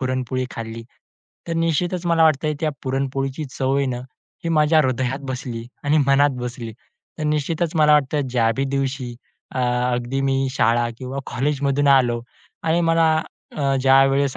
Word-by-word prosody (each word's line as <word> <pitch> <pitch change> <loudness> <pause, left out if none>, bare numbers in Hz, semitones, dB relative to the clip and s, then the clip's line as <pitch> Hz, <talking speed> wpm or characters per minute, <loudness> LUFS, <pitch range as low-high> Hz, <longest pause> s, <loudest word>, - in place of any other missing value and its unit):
पुरणपोळी 130 -1 -2
खाल्ली. 115 0 -6 0.7
तर - - -1
निश्चितच 170 +2 0
मला 165 -1 +3
वाटतंय, 155 0 +2
त्या 155 - +1
पुरणपोळीची 135 +2 -2
चव 135 0 -1
आहे 140 - +1
ना, 125 -2 -2 0.5
ही - - -1
माझ्या 155 0 +4
हृदयात 130 0 -1
बसली 120 -2 -5 0.2
आणि 145 +2 +3
मनात 140 +1 +4
बसली. 120 -2 -5 0.5
तर - - -4
निश्चितच 155 +2 -1
मला 150 -1 +5
वाटतं, 145 0 +2
ज्या 115 -2 +2
बी 135 - 0
दिवशी 135 -2 -2 0.4
अ, - - -2 0.3
अगदी 125 +2 -2
मी 135 0 +1 0.2
शाळा 120 -1 +2
किंवा 130 +1 -5
कॉलेजमधून 140 +1 0
आलो 120 -4 +4 0.4
आणि 165 +1 +2
मला 165 -1 +3 0.5
अ, 140 -2 +1
ज्यावेळेस 135 +1 +4
135 Hz, 150 wpm, -22 LUFS, 130-150 Hz, 0.7 s, मला